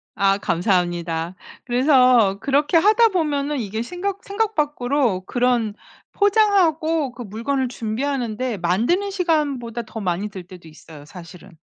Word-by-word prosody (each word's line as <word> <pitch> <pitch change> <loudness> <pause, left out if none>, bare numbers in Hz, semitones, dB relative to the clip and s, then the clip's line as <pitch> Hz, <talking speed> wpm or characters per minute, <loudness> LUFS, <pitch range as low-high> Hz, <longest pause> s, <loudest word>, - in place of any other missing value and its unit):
아 195 0 +2
감사합니다. 175 -2 -1 0.3
그래서 250 -5 +4
그렇게 290 +4 +2
하다 435 +6 +5
보면은 295 -5 -1
이게 220 0 -4
생각 370 +8 -4
생각 435 +1 -2
밖으로 275 -8 0
그런 240 0 0 0.4
포장하고 335 - +2
그 245 - -10
물건을 240 +6 -2
준비하는 240 0 -3
데 250 -4 -2
만드는 235 - 0
시간보다 290 - -1
더 220 0 -8
많이 190 +3 -2
들 190 -2 -9
때도 180 -2 -14
있어요 155 -1 -14
사실은. 175 +1 -13
245 Hz, 305 characters per minute, -21 LUFS, 195-305 Hz, 0.4 s, 하다